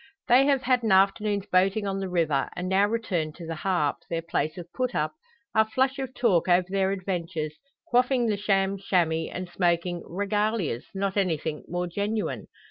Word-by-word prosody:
They 260 +2 +6
have 275 -2 +2
had 255 -1 +2
an 225 -3 0
afternoon's 200 +1 +3
boating 195 +3 +2
on 195 0 -2
the 190 -1 -3
river; 160 -6 +1
and, 180 +1 -3
now 195 +2 +3
returned 185 -9 -2
to 170 - -9
the 165 - -4
"Harp" 165 -3 0
their 165 0 -2
place 155 -1 -2
of 175 - -6
put 255 -1 -2
up 150 +1 0 0.4
are 220 - +5
flush 265 +4 +1
of 265 -1 -5
talk 200 -10 +2
over 180 0 +4
their 190 0 +1
adventures, 175 -5 -3 0.3
quaffing 250 0 +2
the 215 -2 +1
sham 195 -1 +1
"shammy," 165 -4 +1
and 185 0 -5
smoking 175 -1 0
"regalias," 200 - -1
not 195 +1 -1
anything 160 -5 -1
more 175 +1 -2
genuine. 205 +5 -2
190 Hz, 180 wpm, -26 LUFS, 170-215 Hz, 0.4 s, They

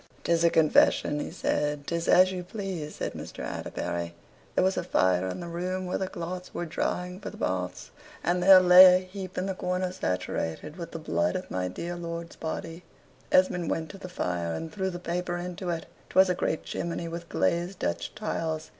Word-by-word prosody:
"'Tis 170 0 +2
a 170 - +6
confession," 155 -2 +4
he - - -3
said. 150 -1 -1
"'Tis 170 +1 -2
as 185 +1 +6
you 180 -1 -4
please," 180 -5 -5
said - - -3
Mr. - - -7
Atterbury. 85 0 -4 0.4
There - - +4
was 190 +1 +2
a - - -1
fire 95 0 +2
in 95 - -4
the 175 - -6
room 180 +2 -3
where 180 - -2
the 190 - -1
cloths 180 +1 -6
were 175 - -2
drying 180 +2 -2
for - - -6
the - - -11
baths, 90 0 -3 0.3
and 180 +1 +1
there 190 +1 +9
lay 180 0 +9
a 185 0 0
heap 185 0 -8
in 185 - -1
a 195 - -1
corner 180 0 -1
saturated 90 - -3
with 170 -2 -6
the - - -6
blood 200 +5 0
of 185 - -5
my 90 0 -1
dear 170 - -5
lord's 170 -1 -6
body. 165 +2 -5 0.5
Esmond 180 -2 +3
went 160 -2 -2
to 195 - -11
the 180 - -8
fire, 85 - -2
and 160 - -5
threw 190 0 -2
the 175 - -5
paper 175 0 -2
into 180 +1 -5
it. 165 -2 -2 0.2
'Twas 190 0 +5
a - - +3
great 160 -2 -1
chimney 170 0 -3
with 170 0 -6
glazed 175 +2 0
Dutch - - -3
tiles. 160 -7 -3
175 Hz, 200 wpm, -28 LUFS, 160-185 Hz, 0.5 s, there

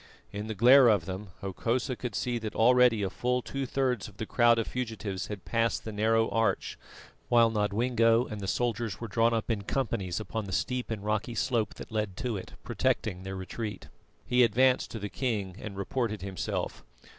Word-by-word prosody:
In 105 +1 -4
the 110 - -4
glare 125 +5 +7
of 105 -7 +3
them, 95 +3 -5
Hokosa 115 +6 -1
could 120 -4 -5
see 120 -1 -1
that 110 -1 -5
already 120 -2 +5
a 95 - 0
full 125 +3 -1
two 135 -1 -4
thirds 125 -4 0
of 105 -1 -15
the 110 - -3
crowd 120 +1 +4
of 115 - 0
fugitives 110 -6 -4
had 105 -3 -7
passed 115 0 0
the 110 - -4
narrow 110 +2 +2
arch; 115 -4 0 0.5
while 115 -1 +5
Nodwengo 115 +2 +2
and 105 -4 -6
the 95 - -4
soldiers 115 -5 -1
were 115 - -5
drawn 115 +3 +2
up 115 0 -1
in 105 -3 -1
companies 100 -5 -2
upon 110 0 -4
the 95 - -6
steep 125 +7 -1
and 105 -3 -4
rocky 110 +2 -1
slope 115 -2 0
that - - -10
led 105 -3 -2
to 120 -1 -2
it, 95 - -7
protecting 90 - -1
their 95 0 -6
retreat. 105 +3 -6 0.4
He 125 0 +4
advanced 125 +3 +3
to - - -6
the 105 -1 -4
king 105 -6 -2
and 105 -3 -7
reported 110 0 -2
himself. 95 -1 -3
110 Hz, 190 wpm, -29 LUFS, 100-120 Hz, 0.5 s, glare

